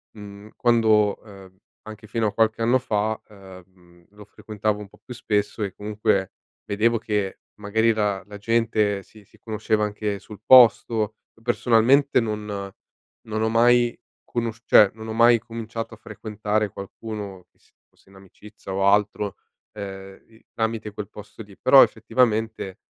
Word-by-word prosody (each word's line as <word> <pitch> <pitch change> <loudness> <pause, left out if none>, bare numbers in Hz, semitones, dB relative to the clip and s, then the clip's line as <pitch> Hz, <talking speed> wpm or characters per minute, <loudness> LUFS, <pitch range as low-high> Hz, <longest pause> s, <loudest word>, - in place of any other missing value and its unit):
mhmm, 105 0 -11
quando 110 -4 +2
ehm, 95 -3 -15 0.3
anche 110 0 -11
fino 115 +1 -1
a 105 - -1
qualche 110 +1 +1
anno 120 +3 +3
fa, 110 -3 -2
ehm, 90 -3 -17
lo 105 0 -15
frequentavo 105 0 -3
un 105 - -9
po' - - -20
più 125 - -9
spesso 105 -2 -2
e 100 -3 -2
comunque 105 -2 -1 0.3
vedevo 115 +3 +1
che 105 -3 -3 0.2
magari 110 +2 +1
la 105 -3 -1
la 105 0 -10
gente 105 -2 0
si 105 +3 -18
si - - -24
conosceva 110 -1 -1
anche 105 -1 -3
sul 105 +1 -13
posto; 115 -3 +5 0.2
uhm, 115 - -24
personalmente 125 +4 +3
non 105 -2 -3 0.8
non 110 0 -3
ho 110 - +1
mai 120 +1 +3 0.3
conosciu 115 -1 -4
cioè, 105 - +7
non 110 0 -9
ho 110 - -4
mai 115 +1 +5
cominciato 115 0 -7
a - - -11
frequentare 105 -1 -3
qualcuno 100 -1 -8
che - - -39
si - - -31 0.2
fosse - - -29
in 95 - -19
amicizia 100 +1 -13
o 95 0 0
altro, 105 0 +1 0.4
ehm, 95 -1 -9
i 110 0 -23
tramite 110 -1 -2
quel 105 -2 -7
posto 105 +2 -12
lì, 100 -2 -17
però 135 +1 +7
effettivamente, 110 -4 -1
105 Hz, 155 wpm, -23 LUFS, 100-115 Hz, 0.8 s, cioè